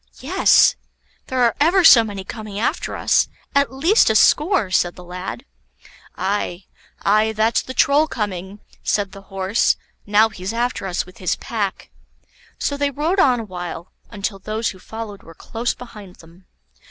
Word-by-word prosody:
"Yes; - - +4 0.5
there 255 -1 0
are 235 - +3
ever 350 +6 +4
so 245 -8 +9
many 200 -3 -6
coming 215 0 -8
after 225 - -1
us, - - +2 0.3
at 280 -1 +2
least 325 - +3
a 220 - +1
score," 300 - +3
said 175 -1 +1
the 180 - -12
lad. 180 +8 -7 0.7
"Aye, 185 -1 -2 0.4
aye, 215 +2 +3
that's 220 +2 +2
the 260 - -9
Troll 290 +5 +4
coming," 200 - -5 0.2
said 200 -2 -1
the 195 - -11
Horse; 195 +2 0 0.3
"now 210 +2 +4
he's 195 -1 -6
after 235 -4 -2
us 180 - -2
with 185 - -16
his 185 - 0
pack." 205 -4 -4 0.7
So 285 - -2
they 285 0 +1
rode 310 +8 -1
on 255 -9 +4
a - - -7
while, 175 -2 -7 0.2
until 200 -1 -4
those 215 +3 -2
who 185 - -10
followed 220 0 -8
were 165 - -15
close 230 +7 -3
behind 210 -7 -12
them. 170 +3 -19
215 Hz, 165 wpm, -20 LUFS, 190-245 Hz, 0.7 s, so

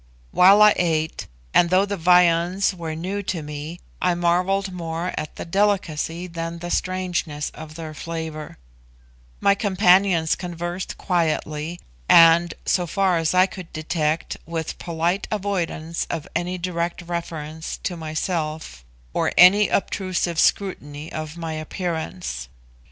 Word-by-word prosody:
While 195 +3 +7
I 210 - +7
ate 160 -2 -1 0.3
(and 170 - +5
though 185 +2 +4
the 200 0 -3
viands 180 +2 +3
were 165 -3 -5
new 190 +5 -3
to 180 -5 -3
me, 150 +3 -7 0.2
I 180 -1 +2
marvelled 180 +3 +1
more 170 0 -4
at 155 - -5
the - - -6
delicacy 175 -3 0
than 165 -1 -5
the 175 +1 -6
strangeness 180 -5 -2
of 155 0 -10
their 160 -1 -7
flavour), 160 -1 -6 0.8
my 200 - +4
companions 190 -4 +3
conversed 175 0 -5
quietly, 165 -1 -1 0.3
and, 165 0 +7
so 180 -2 +1
far 185 +1 +2
as 165 +2 0
I 185 0 +6
could 185 -3 -9
detect, 155 0 -1
with 165 -1 -4
polite 170 +3 -1
avoidance 175 -5 -2
of 165 -3 -4
any 175 +2 -1
direct 175 -1 -3
reference 160 -2 -5
to 180 - -2
myself, 155 - -4 0.3
or - - +1
any 200 +4 +7
obtrusive 180 -3 -1
scrutiny 150 -6 0
of 155 +1 -5
my 165 -1 -4
appearance. 160 - -4
170 Hz, 130 wpm, -23 LUFS, 160-185 Hz, 0.8 s, While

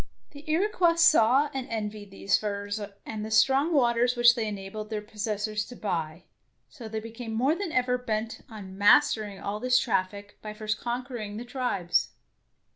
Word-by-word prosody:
The 290 +1 -12
Iroquois 345 0 +2
saw 290 -4 +5
and 265 -1 -4
envied 210 -2 -4
these 195 0 0
furs 205 0 -3 0.2
and 215 -1 -5
the 215 - -5
strong 270 +8 +3
waters 245 -4 +3
which 240 0 +6
they 230 -3 -2
enabled 210 +1 -6
their 215 -1 -2
pos 210 +1 -6
sessors 210 0 -2
to 245 - -10
buy, 170 -6 -3 0.5
so 240 -7 -10
they 220 0 -4
became 225 +1 -7
more 260 +7 +2
than 350 0 -4
ever 250 -2 +1
bent 225 -2 -3
on 200 -4 -9
mastering 210 -2 +4
all 205 +1 -4
this 255 +2 +3
99 190 - +3
DEEDS - - -16
OF - - -24
DARING 200 -1 -9
traffic - - -35
by 215 -1 -7
first 215 0 -3
conquering 240 -4 -4
the 240 - -6
tribes. 240 -9 0
220 Hz, 190 wpm, -27 LUFS, 210-250 Hz, 0.5 s, which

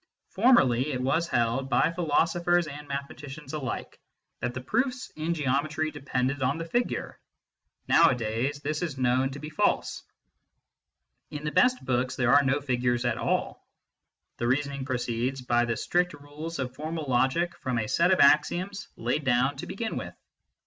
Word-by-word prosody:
Formerly, 150 - +4
it 125 - -2
was 160 +6 +1
held 120 0 0
by 155 - +3
philosophers 170 +1 +2
and 145 0 -8
mathematicians 140 +1 -7
alike 135 -5 -5 0.4
that 120 0 -3
the - - -3
proofs 245 - -1
in 160 +2 -1
Geometry 155 +2 0
depended 135 -1 -2
on 130 +3 +1
the 165 - -4
figure; 240 +9 -2 0.7
nowadays, 130 -1 +2
this 150 +2 -2
is 160 -6 -3
known 130 +1 +2
to 135 - -7
be 150 +1 -7
false. 150 - 0 1.3
In 150 0 -7
the 150 - -2
best 250 +6 +3
books 125 0 0
there 120 0 +2
are 145 - +7
no 140 +1 +1
figures 125 -2 0
at 120 - 0
all. - - -1 0.7
The 120 - -1
reasoning 140 +1 -1
proceeds 125 0 -2
by 120 -1 +2
the 115 -1 -2
strict 180 0 +1
rules 145 +3 -7
of 130 -2 -3
formal 155 +2 -4
logic 135 +7 +1
from 130 -2 -2
a 110 - 0
set 170 - +3
of 190 - +3
axioms 180 +8 +3
laid 120 +6 -1
down 130 +2 +2
to - - -6
begin 220 +2 -4
with. - - -6
140 Hz, 160 wpm, -27 LUFS, 130-165 Hz, 1.3 s, are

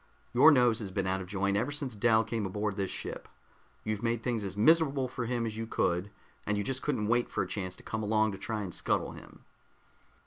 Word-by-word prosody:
"Your 130 +6 +8
nose 125 -6 +4
has 105 -4 -5
been 95 0 -2
out 95 0 0
of 90 - -7
joint 100 0 0
ever 115 +7 +1
since 145 -3 -2
Dal 110 +1 +4
came 110 0 -3
aboard 105 +1 -2
this 100 -2 -2
ship. - - -6 0.6
You've 110 -1 -2
made 115 -1 -1
things 120 -4 -1
as 100 0 -5
miserable 140 +1 +4
for 125 -1 -4
him 120 -1 -1
as 110 -1 -4
you 115 0 -4
could, 90 -2 0 0.3
and 105 0 -1
you 105 - 0
just 130 +5 -2
couldn't 130 -8 -1
wait 120 +3 +1
for - - -1
a - - -6
chance 90 -3 -4
to - - -13
come 110 - -3
along 110 0 +2
to 95 - -7
try 110 -2 -3
to 90 - -6
scuttle - - 0
him." - - -14
110 Hz, 235 wpm, -30 LUFS, 100-120 Hz, 0.6 s, Your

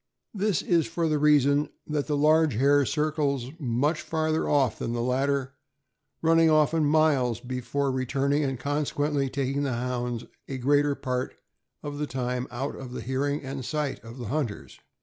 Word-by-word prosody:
This 205 -5 0
is 170 -2 +2
for 170 0 -1
the 155 -1 +1
reason 145 0 +4 0.2
that 150 -2 -2
the 150 -2 0
large 155 -2 +4
hare 140 +2 +4
circles 145 -4 -1
much 145 +4 0
farther 160 0 -1
off 135 -5 +2
than 115 - -2
the 120 - -1
latter, 135 +1 0 0.7
running 165 0 +5
often 155 0 +3
miles 145 -6 +3
before 130 +3 -2
re 130 0 -2
turning, 140 +3 +1
and 135 -3 -2
consequently 145 0 -1
taking 140 +1 -1
the 140 -3 -1
Hounds 120 -1 -3 0.2
a 135 - -4
greater 145 +2 +2
part 125 -1 -3 0.5
of 145 0 -5
the 150 - -1
time 125 0 -2
out 130 +4 -4
of 125 -2 -8
the - - -5
hearing 140 +3 -1
and 135 0 -5
sight 150 +1 -2
of 115 +2 -10
the 125 - -6
hunters. 135 -7 -3
140 Hz, 170 wpm, -27 LUFS, 130-150 Hz, 0.7 s, running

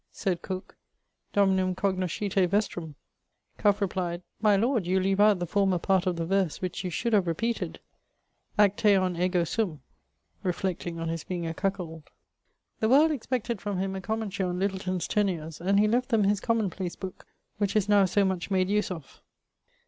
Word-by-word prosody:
Said 180 -3 -2
Cooke 185 -1 -6 0.5
'Dominum 190 -2 +2
cognoscite 185 0 0
vestrum'; 175 -6 -1 0.6
Cuff 205 -1 +3
replied,'My 185 +2 0
lord, 225 -2 +1
you 190 +1 +2
leave 195 +1 +1
out 210 -1 +6
the 175 - -2
former 190 +1 +2
part 190 +1 +1
of 180 - +1
the 165 0 -2
verse, 190 -2 0
which 185 +1 -4
you 180 - -2
should 230 +7 -2
have 195 -4 +3
repeated, 230 +8 -2 0.8
Acteon 200 -3 +4
ego 180 -1 +2
sum' 175 - -2 0.6
reflecting 180 -2 -2
on 165 - -3
his 165 -1 -3
being 175 -2 -4
a 165 - -2
cuckold. 170 -4 -4 0.7
The 220 - +1
world 300 +5 +6
expected 245 -5 -2
from 205 -2 -3
him 190 +1 -2
a 190 - -4
commentary 200 -3 -2
on 180 - -2
Littleton's 185 -2 -1
Tenures; 165 -7 -1
and 195 +3 +3
he 210 - +4
left 245 +4 +1
them 225 -4 +3
his 200 0 +2
Common 225 -4 0
place 180 0 -5
book, 185 -1 -8 0.3
which 205 -1 0
is 210 -2 +2
now 205 -1 +5
so 200 +2 +2
much 190 -1 -2
made 190 -1 +1
use 210 +1 +1
of. 160 -7 -8
190 Hz, 170 wpm, -28 LUFS, 180-205 Hz, 0.8 s, out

